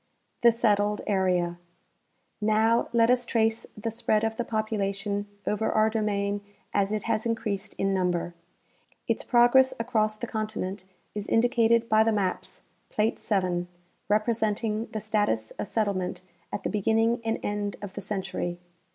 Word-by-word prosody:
The 235 -1 +7
Settled 210 -2 +1
Area. 180 -3 +1 0.8
Now, 220 +2 +3
let 235 0 +4
us 250 0 +3
trace 225 -2 0
the 225 +2 -3
spread 215 -1 +1
of 225 0 0
the 240 - -1
population 205 -2 -2 0.2
over 210 +1 0
our 220 0 +3
domain 205 -2 0 0.3
as 200 0 +1
it 215 -1 -1
has 225 -1 0
increased 215 -4 -3
in 195 0 +1
number. 180 -2 0 0.7
Its - - 0
progress 250 +2 +5
across 215 -2 0
the 240 - -4
continent 215 -4 -4 0.3
is 210 0 -5
indicated 230 0 +3
by 220 -1 +5
the 225 - +2
maps 195 -4 -2 0.3
(plate 215 +1 0
7) 180 -4 0 0.4
representing 215 0 0
the 215 - -4
status 205 - 0
of - - -2
set 220 -2 +1
tlement 185 -3 -2 0.3
at - - -4
the - - -1
beginning 225 +3 +2
and 225 0 0
end 205 -1 -2
of 195 -2 -6
the 200 - -6
century. 190 -3 -3
215 Hz, 150 wpm, -27 LUFS, 200-225 Hz, 0.8 s, The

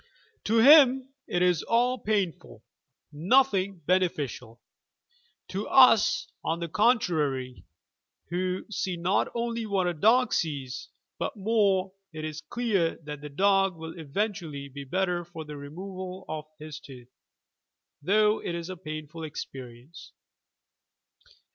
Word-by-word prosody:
To 225 +2 +2
him 265 0 +7
it 175 - 0
is 180 -3 +3
all 245 +2 +1
painful, 200 -5 -2 0.5
nothing 195 - +2
beneficial. 145 -10 -1 0.9
To 195 +3 -4
us, 240 -5 +5 0.2
on 165 +1 -1
the 170 - -3
contrarj', 155 - +1 0.7
who 185 +1 -2
see 185 -3 -2
not 175 +3 +1
only 235 -1 -2
what 195 -3 +1
a 175 - 0
dog 225 +10 +3
sees, 140 -6 -3 0.3
but - - -3
more, 195 -3 +1 0.2
it 155 0 -5
is 155 0 -6
clear 210 -9 0
that 150 -1 -7
the 150 - -7
dog 195 +4 +2
will 160 0 -8
eventually 165 -3 -4
be 140 +1 -8
better 180 +3 -1
for 165 -2 -9
the 150 0 -8
removal 185 +6 -8
of 155 -1 -5
his 155 -1 -8
tooth 125 -4 -13 0.5
— - - -59
though 210 +6 +3
it 170 - -3
is 170 +2 -5
a 185 - -7
painful 155 -1 -7
experience. 135 0 -9
180 Hz, 130 wpm, -27 LUFS, 155-205 Hz, 0.9 s, him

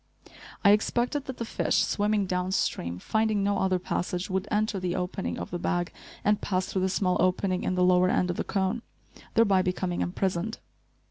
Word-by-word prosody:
I 200 - +9
expected 240 +6 +1
that 260 - -6
the 230 - -3
fish, - - -1
swimming 205 -1 +1
downstream, 180 - -1
finding 215 - 0
no 200 -1 +1
other 190 -1 +2
passage, 180 +1 -3
would 190 +1 -1
enter 215 -1 0
the 180 -1 -2
opening 180 +1 -3
of - - -6
the 175 - -3
bag 175 0 -1 0.3
and 210 0 +3
pass 185 -1 0
through 190 - -2
the 190 - +1
small 185 -1 +1
opening 185 +1 +1
in 185 - 0
the 180 - +2
lower 180 0 +5
end 180 -1 +2
of 175 - -5
the - - 0
cone, 195 +3 -1 0.5
thereby 200 -5 +5
becoming 180 -1 -1
imprisoned. 185 +3 -1
190 Hz, 185 wpm, -27 LUFS, 180-205 Hz, 0.5 s, I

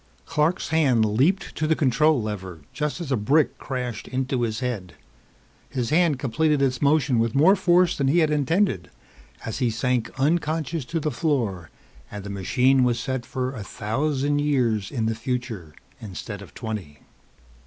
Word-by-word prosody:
Clark's 165 +2 0
hand 135 -8 +3
leaped 135 - +1
to 155 - -1
the 160 - +3
control 150 +2 +3
lever 95 -6 -5
just 150 +2 -2
as 165 -5 -5
a - - +3
brick 135 +8 +2
crashed 125 -4 -4
into 130 0 -1
his 115 -1 -1
head. 100 - -4 0.7
His 125 -1 -2
hand 165 -3 +3
completed 150 +4 +1
its 130 -2 0
motion 140 -4 +3
with 115 +1 0
more 165 +8 +6
force 180 -2 +3
than 140 - 0
he 145 +6 +3
had 155 -3 +3
intended 150 - +1 0.6
as 115 - -4
he 125 -3 +2
sank 120 +1 0
unconscious 155 0 0
to 165 +5 -2
the 155 0 -1
floor 120 - -1 0.4
and 105 -1 -7
the 100 - -6
machine 125 +7 +2
was 120 -1 +1
set 130 -2 -3
for 130 0 -3
a 110 -6 -6
thousand 140 +8 -1
years 120 -9 +1
in 115 -5 -2
the 115 - +1
future 115 - -4 0.3
instead 100 0 -7
of 100 - -13
twenty. 105 -10 -6
130 Hz, 165 wpm, -24 LUFS, 110-150 Hz, 0.7 s, more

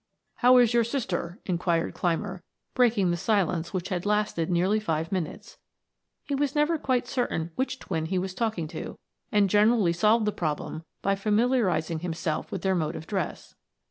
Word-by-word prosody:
"How 250 +1 +6
is 240 -2 +5
your 235 -1 +4
sister?" 210 -7 -3
inquired 170 -2 0
Clymer, 180 +2 -2 0.3
breaking 225 -7 +3
the 175 - 0
silence 180 -4 0
which 185 -1 -3
had 180 -3 -2
lasted 210 -5 0
nearly 185 +5 +2
five 160 -6 -2
minutes. 180 -5 -4 0.6
He 285 - -4
was 280 0 0
never 300 +2 +2
quite 255 -3 0
certain 170 -11 -2
which 260 +3 -2
twin 160 -9 -3
he 185 +2 -1
was 185 +1 -2
talking 215 -6 -2
to, - - -7 0.3
and 205 -2 +4
generally 210 -2 +4
solved 215 +6 +3
the 210 - +1
problem 155 -1 -3 0.2
by 195 - +2
familiarizing 205 -5 +1
himself 165 -2 -3
with - - -4
their 190 -1 +2
mode 165 -2 -1
of 160 - -7
dress. 190 -2 -4
195 Hz, 170 wpm, -27 LUFS, 170-225 Hz, 0.6 s, How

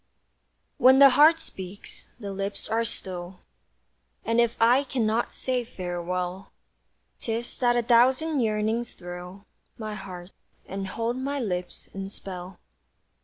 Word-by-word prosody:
When 260 +1 +7
the 275 0 +9
heart 310 +5 +6
speaks, 190 - -10
the 200 -3 -5
lips 195 +1 -3
are 225 +1 +1
still, 180 -4 -5 0.8
And 230 +1 +3
if 235 -1 +1
I 245 +4 +5
cannot 235 -4 0
say 255 -1 -1
farewell, 180 -2 -4 0.7
'Tis 230 +1 -3
that 240 -1 +3
a 240 - +2
thousand 260 +6 +4
yearnings 220 +1 0
thrill 180 +3 -9 0.3
My 215 -2 -5
heart, 185 -2 -8 0.4
and 195 0 -4
hold 230 +5 -2
my 280 +2 -2
lips 180 -7 -3
in 195 0 -5
spell. 185 -1 -8
215 Hz, 125 wpm, -26 LUFS, 190-240 Hz, 0.8 s, the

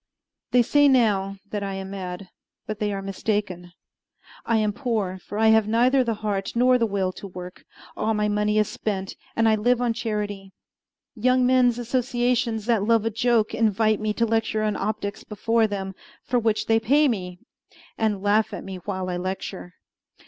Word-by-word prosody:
They 245 -1 +4
say 290 +4 +4
now 205 -7 +2
that 205 - -2
I 195 -1 -3
am 190 0 -6
mad; 185 -1 -6 0.4
but 215 0 -5
they 210 -2 0
are 195 -1 -4
mistaken. 195 -3 -3 0.8
I 230 - +3
am 215 -1 +1
poor, 210 -7 -2
for 205 - -8
I 220 0 +4
have 220 -1 +4
neither 250 +4 +3
the 230 -2 -1
heart 195 -2 -2
nor 250 +1 +4
the 230 - +2
will 195 -2 -1
to 200 - -9
work; 180 -1 -9 0.3
all 220 +1 0
my 210 0 +1
money 210 0 +1
is 215 -1 +3
spent, 195 -3 -4 0.2
and 225 0 +3
I 220 - +5
live 240 +3 +2
on 245 -2 +1
charity. 205 -4 -4 0.6
Young 255 +2 +2
men's 250 -2 +4
associations 240 -2 0
that 230 -3 +2
love 225 +1 +2
a 225 - 0
joke 230 0 +1
invite 215 -1 +2
me 215 0 -1
to 230 - +1
lecture 225 -1 0
on 210 -1 0
optics 205 0 -3
before 225 +2 +1
them, 195 -2 -4 0.3
for 245 - +1
which 220 -2 0
they 225 0 +3
pay 285 +7 +3
me, 180 -7 -3 0.6
and 210 -3 -1
laugh 210 +1 +2
at - - -7
me 190 -1 -7
while 185 0 -4
I 180 -1 -2
lecture. 185 0 -5
215 Hz, 185 wpm, -24 LUFS, 195-230 Hz, 0.8 s, I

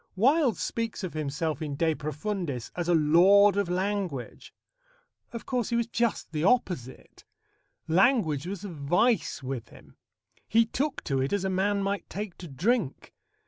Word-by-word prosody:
Wilde 260 - +3
speaks 230 -3 -3
of 185 - -4
himself 155 +1 -2
in 150 -3 -3
De 160 +2 +1
Profundis 155 - -4
as 175 -1 -2
a 175 - +5
lord 185 +6 +6
of 200 -3 0
language. 185 - -3 0.8
Of 235 - -7
course, 250 -3 -1
he 235 - 0
was 235 0 +1
just 235 -4 -1
the 155 -1 -2
opposite. 180 - -1 0.6
Language 170 - +2
was 200 +1 -5
a - - -5
vice 175 - +1
with 130 -3 -5
him. - - -17 0.5
He 230 +1 +4
took 275 +5 -2
to 135 -3 -1
it 135 - -1
as 205 -2 0
a 190 - 0
man 200 +2 +1
might 200 +1 -3
take 205 -2 -5
to 175 - -8
drink. 170 - -1
185 Hz, 160 wpm, -27 LUFS, 155-215 Hz, 0.8 s, lord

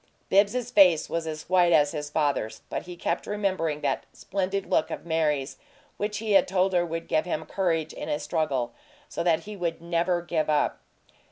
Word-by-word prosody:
Bibbs's 215 +5 +2
face 180 -6 +5
was 165 -1 -2
as 155 -1 -6
white 180 -1 +4
as 145 -3 +4
his 150 -2 -4
father's, 145 -7 -1
but - - -4
he 180 - -7
kept 170 0 -2
remembering 185 -7 -1
that - - -1
"splendid 195 +1 -2
look" - - +1
of - - -6
Mary's 150 -4 0 0.4
which 210 +1 -2
he 220 0 -3
had 195 - +5
told 190 0 +1
her 175 -1 +3
would 165 -1 -4
give 155 - +1
him 170 -3 -3
courage 165 -5 -1
in - - -6
a 150 - +1
struggle, 150 -5 -1 0.3
so - - -4
that 170 -2 +2
he 210 +4 -8
would 170 -3 -2
"never 170 +1 0
give 160 -3 -1
up." 150 -1 +1
170 Hz, 190 wpm, -26 LUFS, 155-185 Hz, 0.4 s, face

